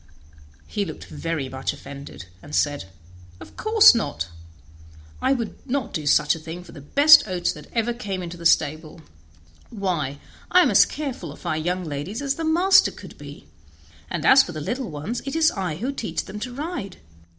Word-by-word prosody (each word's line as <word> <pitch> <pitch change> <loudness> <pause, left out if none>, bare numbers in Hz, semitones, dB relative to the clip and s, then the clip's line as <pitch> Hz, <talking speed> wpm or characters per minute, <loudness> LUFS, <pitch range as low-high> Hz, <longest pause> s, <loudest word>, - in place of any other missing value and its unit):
He 205 - -2
looked 160 -6 -8
very 165 -5 -4
much 130 0 -3
offended, 140 -9 -10 0.2
and 150 - -7
said: 145 -6 0 0.5
"Of - - -13
course 435 -3 +7
not; 85 - -3 0.9
I 260 - +2
would 235 -5 -2
not 270 -1 -2
do 150 -2 -3
such 150 0 +4
a 165 - -6
thing 165 +3 -8
for 175 - -14
the 145 - -11
best 290 - +6
oats 180 -2 -1
that 150 - -11
ever 235 0 0
came 200 -6 -5
into 175 0 -6
the 170 - -11
stable; 155 +1 0 0.7
why, 175 - -2 0.3
I 360 0 +6
am - - +2
as - - +7
careful 265 - -5
of 145 - -14
our 165 -2 0
young 180 +4 -2
ladies 155 - -5
as 275 -1 0
the 325 - -5
master 350 +5 +5
could - - -12
be, - - -11 0.6
and - - -3
as 265 +1 +8
for 175 - -5
the 155 - -5
little 245 - -3
ones 160 +11 -4
it 275 +3 -5
is 320 -1 +4
I 185 -6 -3
who 245 - -3
teach 255 -5 -4
them 210 - -8
to 250 +3 -5
ride. 280 - -5
185 Hz, 190 wpm, -23 LUFS, -, 0.9 s, as